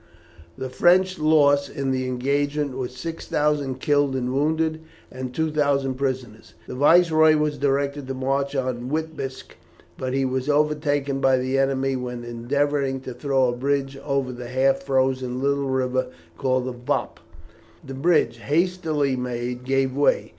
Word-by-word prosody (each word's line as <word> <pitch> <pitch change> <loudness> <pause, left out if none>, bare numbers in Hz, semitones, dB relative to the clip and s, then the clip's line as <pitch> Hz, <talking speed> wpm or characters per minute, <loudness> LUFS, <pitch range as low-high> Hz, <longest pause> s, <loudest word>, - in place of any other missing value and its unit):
The 130 - -4
French 185 +5 +3
loss 145 -2 +4
in 135 -1 -2
the 130 0 -1
engagement 140 +2 -1
was 125 -1 -4
6000 150 -3 -1
killed 145 -1 +2
and 125 -1 -2
wounded, 155 +3 0 0.3
and 130 0 -6
2000 145 -2 0
prisoners. 130 -6 -4
The - - -8
Viceroy 155 +2 +5
was 150 -1 0
directed 140 0 0
to 135 - -4
march 135 +2 -1
on 125 -2 -2
Witebsk, 155 -3 -4 0.4
but 130 0 -3
he 135 0 +1
was 130 +2 -2
overtaken 145 -2 +1
by 135 -1 +4
the 130 +1 0
enemy 135 0 +1
when 125 -1 -5
endeavouring 135 +3 -1
to 130 - -7
throw 135 0 +1
a 120 - -2
bridge 135 +1 -1
over 140 -3 -1
the 125 0 -8
half 135 +1 +2
frozen 130 -2 0
little 140 0 0
river 130 -1 0 0.3
called 130 +3 0
the 130 - -3
Vop. 120 0 -3 0.7
The 135 - -7
bridge, 150 -3 +2
hastily 155 -2 0
made, 125 0 -4
gave 135 0 +1
way. 145 0 +2
135 Hz, 145 wpm, -23 LUFS, 130-145 Hz, 0.7 s, Viceroy